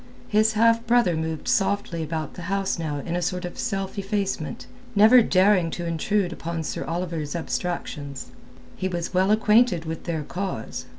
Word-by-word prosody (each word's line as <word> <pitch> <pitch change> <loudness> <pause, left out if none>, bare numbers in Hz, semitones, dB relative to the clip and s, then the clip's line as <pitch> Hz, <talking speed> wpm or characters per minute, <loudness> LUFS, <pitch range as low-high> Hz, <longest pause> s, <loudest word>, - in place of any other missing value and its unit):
His 215 +1 +3
half 230 +1 +4
brother 235 -7 +4
moved 160 0 -3
softly 195 -4 +1
about 160 0 -4
the - - -9
house 195 -2 0
now 155 -3 -2
in 170 - -2
a 175 - -1
sort 180 +1 -2
of 175 - -7
self 195 -3 -2
effacement, 195 -5 -2 0.3
never 220 +5 +8
daring 185 -4 +3
to 175 - -4
intrude 175 +3 0
upon 165 0 -4
Sir - - -3
Oliver's 165 -3 -3
abstractions. 160 -5 -4 0.4
He 185 - -2
was 175 -1 -3
well 185 +2 +3
acquainted 215 -4 +4
with 160 0 -5
their 160 -3 -2
cause. 180 - -5
180 Hz, 165 wpm, -24 LUFS, 165-205 Hz, 0.4 s, never